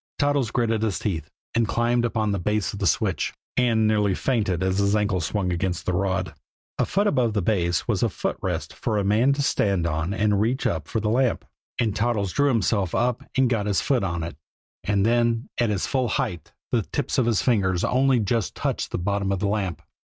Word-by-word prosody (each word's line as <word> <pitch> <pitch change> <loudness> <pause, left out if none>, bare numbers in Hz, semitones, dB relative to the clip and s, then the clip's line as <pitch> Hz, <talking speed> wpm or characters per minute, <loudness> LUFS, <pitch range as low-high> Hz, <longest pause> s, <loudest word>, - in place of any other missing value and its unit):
Toddles 145 -5 +1
gritted 115 -2 0
his 110 -4 0
teeth, 85 -6 -3 0.2
and 115 -1 +2
climbed 120 +3 +1
upon 110 -3 0
the 100 - -1
base 105 +3 -1
of 100 - -6
the 100 - +1
switch - - 0 0.2
and 115 -3 +3
nearly 105 -3 +2
fainted 105 -9 0
as 95 +1 +1
his 100 +1 +2
ankle 105 -3 +1
swung 90 +2 -1
against 90 0 -2
the 90 - 0
rod. 95 -2 -1 0.5
A - - +2
foot 200 +2 +1
above 125 - +2
the 105 - +1
base 85 -4 0
was - - 0
a - - +2
footrest - - -3
for 110 - -2
a 100 - +1
man 110 +7 +3
to 145 +1 -1
stand 100 -9 +1
on 80 +2 -1
and 105 0 +1
reach 120 +5 0
up 80 -2 -1
for 110 - -1
the 105 0 0
lamp, 125 +1 +1 0.3
and 110 -4 +1
Toddles 105 -5 0
drew 145 - +3
himself 105 -6 +1
up 120 0 +1 0.2
and 130 -1 +4
got 110 -4 0
his 100 -2 +2
foot 130 -6 +1
on 85 -3 -2
it 85 -3 -6 0.5
and 100 -1 +1
then 120 0 +1
at 120 -2 +2
his 100 -3 0
full 130 -3 0
height 85 -7 -2 0.2
the - - +2
tips - - -2
of 120 - +2
his 115 -4 +2
fingers 95 -7 +1
only 130 0 +3
just 110 0 -1
touched - - -2
the - - -3
bottom 100 +2 -1
of 100 - +1
the 100 +2 -1
lamp. 100 -5 -2
105 Hz, 215 wpm, -24 LUFS, 95-120 Hz, 0.5 s, and